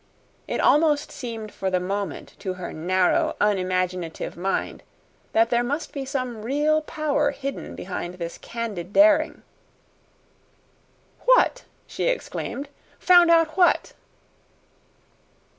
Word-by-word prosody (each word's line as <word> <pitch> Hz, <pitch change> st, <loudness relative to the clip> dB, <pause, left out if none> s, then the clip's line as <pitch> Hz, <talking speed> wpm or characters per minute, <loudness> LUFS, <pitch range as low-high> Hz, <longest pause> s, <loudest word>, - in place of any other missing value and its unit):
It -, -, -2 dB
almost 300 Hz, -1 st, +3 dB
seemed 225 Hz, -4 st, -6 dB
for 190 Hz, -, -2 dB
the 185 Hz, -1 st, +1 dB
moment 195 Hz, +2 st, -4 dB
to 190 Hz, -2 st, -4 dB
her 180 Hz, -1 st, -7 dB
narrow, 180 Hz, +3 st, +1 dB
unimaginative 185 Hz, -4 st, -1 dB
mind 190 Hz, +3 st, -2 dB, 0.5 s
that 230 Hz, +1 st, +3 dB
there 240 Hz, 0 st, +3 dB
must 285 Hz, +6 st, -3 dB
be 275 Hz, -2 st, -4 dB
some 255 Hz, -5 st, -3 dB
real 295 Hz, +6 st, +1 dB
power 300 Hz, -2 st, 0 dB
hidden 275 Hz, -1 st, -6 dB
behind 180 Hz, -1 st, -5 dB
this 170 Hz, -2 st, -6 dB
candid 205 Hz, -6 st, -5 dB
daring. 305 Hz, +2 st, +4 dB, 1.8 s
"What?" -, -, +4 dB, 0.2 s
she -, -, -4 dB
exclaimed. 475 Hz, -, -3 dB, 0.3 s
"Found 350 Hz, -1 st, +6 dB
out 330 Hz, -2 st, +4 dB
what?" 360 Hz, -1 st, +3 dB
235 Hz, 110 wpm, -24 LUFS, 185-300 Hz, 1.8 s, Found